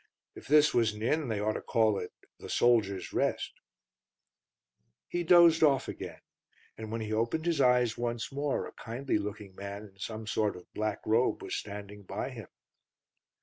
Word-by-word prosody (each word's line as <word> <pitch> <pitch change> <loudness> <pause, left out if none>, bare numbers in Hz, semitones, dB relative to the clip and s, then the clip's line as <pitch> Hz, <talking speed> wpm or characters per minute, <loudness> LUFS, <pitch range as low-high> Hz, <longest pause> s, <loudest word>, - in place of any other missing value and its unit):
If - - -12
this 150 +1 +5
was 115 -3 +3
an 105 +1 -7
inn 150 +4 +1
they 110 -3 -1
ought 105 +1 0
to - - -4
call 110 -4 +2
it 90 - -6 0.3
The - - -9
Soldiers' 105 -6 +2
Rest." - - 0 1.5
He 175 0 -2
dozed 170 -1 +7
off 140 -4 +4
again, - - -7 0.5
and 110 -1 -7
when 115 0 -3
he 110 0 -3
opened 115 +9 0
his 165 -4 +1
eyes 125 -3 +3
once 120 +1 -2
more 140 +1 -1
a - - -8
kindly 120 0 -2
looking 105 -1 -6
man 100 +2 -7
in 100 -2 -16
some 110 +2 -5
sort 105 0 0
of 90 - -11
black 110 -1 -2
robe 115 +3 +2
was - - -3
standing 105 0 -7
by 95 - -4
him. - - -9
110 Hz, 175 wpm, -30 LUFS, 105-135 Hz, 1.5 s, dozed